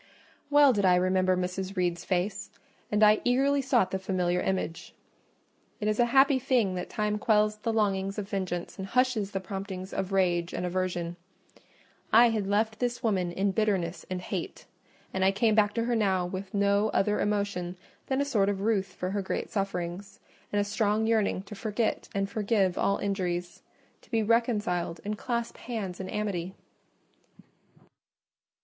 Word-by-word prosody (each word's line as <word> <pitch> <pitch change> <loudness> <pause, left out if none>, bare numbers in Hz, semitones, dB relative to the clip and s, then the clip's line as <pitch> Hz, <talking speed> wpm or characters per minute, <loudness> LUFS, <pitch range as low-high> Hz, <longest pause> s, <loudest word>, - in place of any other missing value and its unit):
Well 290 -2 +6
did 205 -3 0
I 180 -1 +5
remember 185 0 +2
Mrs. 185 +2 -3
Reed's 175 -1 0
face, 190 +2 -1 0.4
and 210 +1 +3
I 210 0 +6
eagerly 275 +3 +2
sought 245 -8 +2
the 190 - -1
familiar 180 -2 0
image. 185 -3 -3 0.8
It 210 - -2
is 215 +1 0
a 240 - +5
happy 270 +2 +5
thing 245 -7 +1
that 180 -1 -4
time 210 0 -1
quells 210 -1 +2
the 225 +2 -2
longings 195 -2 0
of 205 -2 -3
vengeance 185 -3 -4
and 190 - -4
hushes 250 -3 +1
the 195 - -3
promptings 190 0 -6
of 195 0 -2
rage 175 -3 +1
and 180 - -2
aversion. 175 -1 -2 0.9
I 235 +1 +7
had 210 -3 -1
left 215 +2 0
this 245 -1 -2
woman 185 -6 +1
in 195 +3 0
bitterness 190 -4 0
and 185 -1 -3
hate, - - -5 0.5
and 190 - 0
I 190 - +5
came 215 +3 +2
back 210 -1 +4
to 230 - +1
her 240 0 0
now 190 -5 +1
with 185 +2 -6
no 200 +1 +2
other 210 +1 +1
emotion 200 -4 -1 0.3
than 265 +1 +1
a - - +1
sort 210 -8 +2
of 195 -1 -2
ruth 195 -4 0
for 185 +1 -3
her 200 0 -1
great 190 - -3
sufferings, 195 0 -3 0.3
and 205 - +1
a - - +3
strong 210 +1 0
yearning 220 -4 +1
to 205 - -10
forget 215 +2 -2
and 195 0 0
forgive 200 -2 +1
all 200 0 +1
injuries—to 180 -3 -5
be 225 -2 +1
reconciled 210 -7 0
and 210 0 -3
clasp 235 -2 -3
hands 210 -7 -5
in 190 -1 -5
amity. 195 -4 -3
200 Hz, 170 wpm, -28 LUFS, 185-220 Hz, 0.9 s, I